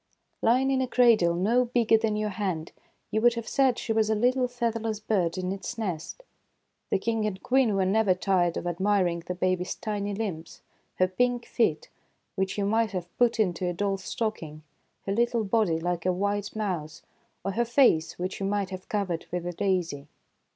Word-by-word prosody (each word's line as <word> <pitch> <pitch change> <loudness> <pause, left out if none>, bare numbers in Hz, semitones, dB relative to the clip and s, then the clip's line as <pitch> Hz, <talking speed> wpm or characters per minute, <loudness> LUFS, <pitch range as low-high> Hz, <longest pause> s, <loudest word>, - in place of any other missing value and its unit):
Lying 255 +4 +3
in 265 -1 +2
a 260 - 0
cradle 230 -9 +4
no 225 +8 +3
bigger 235 -2 +3
than 220 -1 +1
your 210 0 -1
hand, 185 -5 -3 0.4
you 220 - +1
would 240 0 +4
have 230 -1 -5
said 265 -3 +2
she 225 - -2
was 220 -1 +2
a 220 - +2
little 250 +3 +2
featherless 230 -3 -2
bird 190 -6 0
in 185 0 -2
its 200 +5 -5
nest. 190 - -4 0.7
The - - +2
King 220 +1 -1
and 190 -3 -5
Queen 250 -5 +3
were 190 -1 +2
never 195 -1 +3
tired 180 -2 +1
of - - -4
admiring 180 0 +1
the 180 +2 -5
baby's 185 0 -1
tiny 205 -2 -3
limbs; 190 -7 -5 0.3
her 185 - +3
pink 245 +5 0
feet, 160 -10 0 0.5
which 190 +1 -2
you 200 - 0
might 220 +1 +1
have 175 -2 -5
put 240 -1 +3
into 180 -3 +1
a 175 - -1
doll's 195 +1 -2
stocking; 165 -10 -4 0.4
her 195 - -2
little 235 +1 +1
body, 195 -5 +1
like 175 +1 -2
a - - +4
white 205 +3 -2
mouse; 170 -6 -3 0.4
or 195 - 0
her 235 +5 +1
face, 235 - +3
which 185 +2 -4
you 195 - -2
might 200 -1 -1
have 185 0 -8
covered 190 -6 -2
with 175 0 -3
a 175 - -3
daisy. 170 -7 -1
200 Hz, 190 wpm, -27 LUFS, 180-225 Hz, 0.7 s, cradle